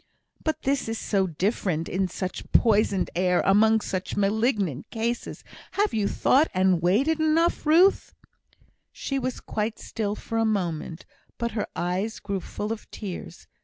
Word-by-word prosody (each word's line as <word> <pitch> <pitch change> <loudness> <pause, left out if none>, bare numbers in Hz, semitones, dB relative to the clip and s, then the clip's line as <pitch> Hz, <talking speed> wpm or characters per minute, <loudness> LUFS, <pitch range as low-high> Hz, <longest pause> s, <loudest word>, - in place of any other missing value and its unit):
"But 315 -1 -2
this 275 -3 0
is 225 - -2
so 195 -3 0
different! 175 -1 -1
in 190 +1 0
such 185 +1 -5
poisoned 205 -4 +3
air! 180 0 +2
among 220 +3 +5
such 185 -2 -4
malignant 205 - 0
cases! 235 +1 -3 0.3
Have 410 +1 +1
you 210 -2 +1
thought 285 +9 +3
and 185 -2 +3
weighed 195 - +3
it 320 0 +1
enough, 315 +1 +2
Ruth?" 350 +6 +4 0.8
She 275 -1 -3
was 255 -1 -3
quite 215 +1 -3
still 210 -2 -3
for 225 +1 -3
a - - +3
moment, 175 -6 -2 0.3
but 235 0 -2
her 215 -1 -2
eyes 185 +5 -2
grew 200 -1 -3
full 210 +4 -5
of 225 - -11
tears. 180 -4 -7
210 Hz, 155 wpm, -26 LUFS, 185-235 Hz, 0.8 s, among